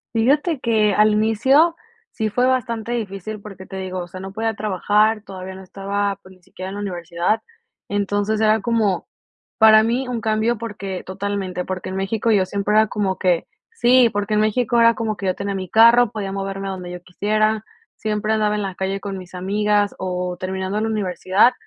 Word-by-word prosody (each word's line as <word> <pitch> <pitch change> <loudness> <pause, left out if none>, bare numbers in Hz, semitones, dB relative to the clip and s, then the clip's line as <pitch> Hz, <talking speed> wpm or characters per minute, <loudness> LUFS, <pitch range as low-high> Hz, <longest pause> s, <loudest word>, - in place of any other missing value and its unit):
Fíjate 285 +7 +2
que 215 -4 +2
al 210 +1 +4
inicio 260 +10 +3 0.4
sí 220 -1 -2
fue 245 +4 +1
bastante 235 -3 -1
difícil 215 -2 -4
porque, 195 -2 -10
te 190 - -8
digo, 185 -1 -4
o 175 - -7
sea, 185 +2 -9
no 190 +1 -7
podía 225 +2 -1
trabajar, 210 +1 +1
todavía 190 -1 -8
no 190 - -10
estaba, 200 +1 -2
pues, 190 0 -16
ni 185 - -27
siquiera 185 0 -8
en 195 - -7
la 205 - -5
universidad. 175 +1 -1 0.5
Entonces 205 +1 0
era 220 -1 +3
como 215 -4 0 0.5
para 220 -1 +8
mí 240 +4 0
un 240 -2 -3
cambio 220 +1 0
porque 200 -5 -5
totalmente, 190 -1 -3
porque 185 -1 -4
en 190 - -5
México 200 +4 -1
yo 195 -3 +3
siempre 200 +2 -1
era 215 0 +5
como 195 -3 -1
que 180 -3 +1 0.2
sí, 250 - +4
porque 205 +1 -1
en 210 - +3
México 235 +2 +1
era 230 0 +6
como 220 -2 -3
que 195 - -5
yo 185 - +2
tenía 200 0 -3
mi 185 -1 -4
carro, 230 +3 +6
podía 200 -3 -4
moverme 195 0 -4
a - - -2
donde 180 -1 -7
yo 180 0 -7
quisiera, 215 +4 0 0.3
siempre 215 0 -1
andaba 215 -1 +1
en 210 - -1
la 195 -2 -4
calle 190 +1 -2
con 195 -1 -5
mis 185 -1 -11
amigas 205 +2 0
o 180 -1 -3
terminando 190 +2 -2
la 220 - 0
universidad, 200 +2 +2
205 Hz, 195 wpm, -21 LUFS, 190-220 Hz, 0.5 s, para